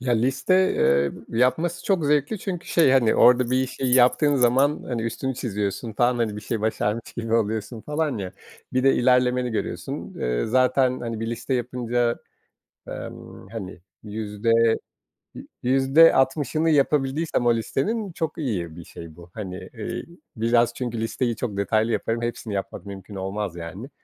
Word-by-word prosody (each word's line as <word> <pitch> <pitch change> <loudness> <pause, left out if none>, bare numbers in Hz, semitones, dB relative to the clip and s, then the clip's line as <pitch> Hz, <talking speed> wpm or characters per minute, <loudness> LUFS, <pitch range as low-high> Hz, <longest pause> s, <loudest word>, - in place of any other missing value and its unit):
Ya, 125 -1 0
liste, 130 +10 +1 0.2
eee, 70 0 +3 0.3
yapması 160 +8 +1
çok 185 -6 +1
zevkli 150 +7 +1
çünkü 180 -3 -5
şey, 160 -6 +4
hani, 125 -4 +4
orada 125 0 +5
bir 130 - +2
işi 130 +1 -5
yaptığın 130 +3 +4
zaman, 130 +4 +3
hani, 120 -3 -2
üstünü 130 +3 -3
çiziyorsun 105 0 -3
falan, 120 +3 +2
hani, 110 -3 -1
bir - - -6
şeyi 110 +1 -3
başarmış 110 +1 -2
gibi 115 -1 -1
oluyorsun 110 +1 -1
falan 150 -4 -2
ya. 95 -1 -5 0.4
Bir 130 0 +1
de 135 - +5
ilerlemeni 125 0 +2
görüyorsun. 110 - -4
Eee, - - 0
zaten, 130 +1 +2
hani, 115 -2 -4
bir 115 - -2
liste 125 +3 -3
yapınca, 120 -1 -1 0.7
emm, - - -9
hani, 95 -5 -7 0.2
yüzde, 105 +1 -2 0.8
yü - - -10 0.2
yüzde 135 +6 +5
altmışını 145 +4 +1
yapabildiysem 140 -1 +1
o 120 - +5
listenin, 200 - -2
çok 160 0 -4
iyi 90 - -3
bir 85 - -9
şey 85 -1 -11
bu. 85 0 -14
Hani, 95 -4 -6 0.2
eee, 110 -2 -5 0.3
biraz 115 +1 +2
çünkü 120 -3 -4
listeyi 115 +1 -1
çok 105 -5 -4
detaylı 110 +3 +1
yaparım, 115 +1 -1
hepsini 115 -3 -4
yapmak 100 +1 -5
mümkün 100 +1 -9
olmaz, 95 -1 -4
yani. 95 - -8
120 Hz, 155 wpm, -24 LUFS, 105-135 Hz, 0.8 s, orada